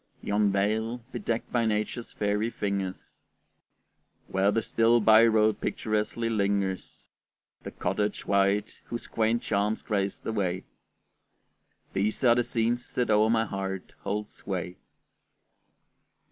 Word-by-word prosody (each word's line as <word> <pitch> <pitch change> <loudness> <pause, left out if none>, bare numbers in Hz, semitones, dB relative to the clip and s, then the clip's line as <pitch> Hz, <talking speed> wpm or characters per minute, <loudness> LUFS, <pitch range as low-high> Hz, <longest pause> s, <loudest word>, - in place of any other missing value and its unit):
Yon 105 0 +2
vale, 110 +4 0
bedecked 115 -1 -3
by 120 -1 +2
nature's 110 +2 -1
fairy 105 +2 0
fingers, 100 -4 -4 1.1
Where 95 +1 +2
the 110 +2 +1
still 115 +1 +3
by 110 +1 +7
road 110 -1 +3
picturesquely 110 +2 -1
lingers, 100 -3 -1 0.5
The - - -6
cottage 105 +3 -2
white 100 +1 +1
whose 120 - -5
quaint 115 +1 0
charms 105 +1 0
grace 100 -2 -1
the 110 - -4
way 95 -4 -1 1.3
These 105 +5 -1
are 120 -2 +7
the 120 0 +2
scenes 120 +1 -1
that 120 -3 +1
o'er 105 +1 +4
my 110 -1 +3
heart 95 -2 -5
hold 105 +1 -3
sway. 90 -2 -5
105 Hz, 120 wpm, -28 LUFS, 100-115 Hz, 1.3 s, by